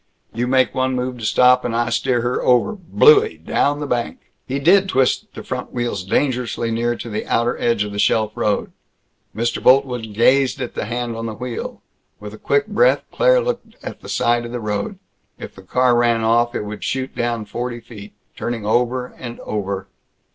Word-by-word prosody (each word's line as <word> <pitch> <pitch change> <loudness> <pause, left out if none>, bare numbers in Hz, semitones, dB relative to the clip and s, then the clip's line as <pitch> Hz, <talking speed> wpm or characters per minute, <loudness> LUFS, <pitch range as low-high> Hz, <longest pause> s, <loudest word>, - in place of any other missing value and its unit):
You 120 +2 -1
make 130 0 +2
one 130 -1 0
move 125 0 -3
to 110 - -5
stop, 125 +2 +4
and 120 -2 -2
I 115 0 0
steer 120 0 +1
her 120 +1 -1
over 125 - +3
Blooie! 430 - +4
Down 145 +1 +1
the 150 - -3
bank!" 120 -4 -3 0.2
He 135 - -2
did 190 +7 +4
twist 130 -6 +1
the - - -7
front - - -5
wheels 120 -6 -2
dangerously 120 +2 -1
near 120 +1 0
to 120 - -8
the 110 -1 -4
outer 120 +1 +1
edge 115 -3 +1
of 105 - -6
the 100 - -5
shelf 110 0 +2
road. 105 -1 -1 0.6
Mr. 115 +1 -1
Boltwood 125 -5 +2
gazed 130 +4 +3
at 125 -2 -4
the - - -3
hand 120 +1 -3
on 115 0 -4
the 110 - -5
wheel. 125 - -6 0.4
With - - -9
a - - -11
quick 425 -1 +1
breath - - +3
Claire - - +4
looked - - -4
at - - -7
the - - -11
side 120 0 +1
of 120 - -7
the 120 - -4
road. 105 - -3 0.4
If - - -9
the 95 - -13
car 125 +6 +2
ran 120 -1 +2
off, 120 +2 +2
it - - -2
would 105 0 -7
shoot 130 0 -3
down 120 -2 -2
forty 120 +3 -4
feet... 110 -3 -12 0.2
turning 115 -3 -4
over 125 +3 +1
and 120 -2 -7
over. 100 -2 -4
120 Hz, 200 wpm, -20 LUFS, 115-130 Hz, 0.6 s, stop